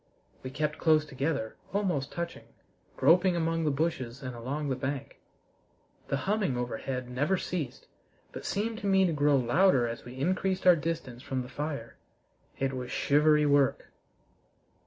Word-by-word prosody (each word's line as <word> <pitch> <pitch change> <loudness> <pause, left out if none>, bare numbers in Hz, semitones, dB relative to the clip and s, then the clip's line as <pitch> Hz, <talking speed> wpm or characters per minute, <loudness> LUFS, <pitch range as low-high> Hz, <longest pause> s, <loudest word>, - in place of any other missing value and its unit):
We 130 - -6
kept 150 +3 -2
close 155 -2 +4
together, 140 -4 -2 0.2
almost 180 -9 0
touching, 170 0 -5 0.5
groping 175 +5 +5
among 165 -1 0
the - - +3
bushes 140 -4 -2
and 130 -1 -5
along 140 +5 -3
the 130 - 0
bank. 135 +1 -4 0.9
The 135 - 0
humming 195 - +1
overhead 125 +1 -3
never 145 +10 0
ceased, 165 -8 -4 0.5
but - - -8
seemed 220 +2 -2
to 205 - -3
me 190 -1 +4
to 170 - +1
grow 145 -1 +3
louder 130 +1 +3
as 115 0 -6
we 125 +1 -10
increased 185 +5 0
our 180 -1 +8
distance 155 -6 -4
from 130 -2 -3
the 125 - -10
fire. 140 -4 -5 0.6
It 135 0 -1
was 125 -1 -5
shivery 150 +3 +3
work! 140 -2 +2
145 Hz, 155 wpm, -29 LUFS, 130-170 Hz, 0.9 s, our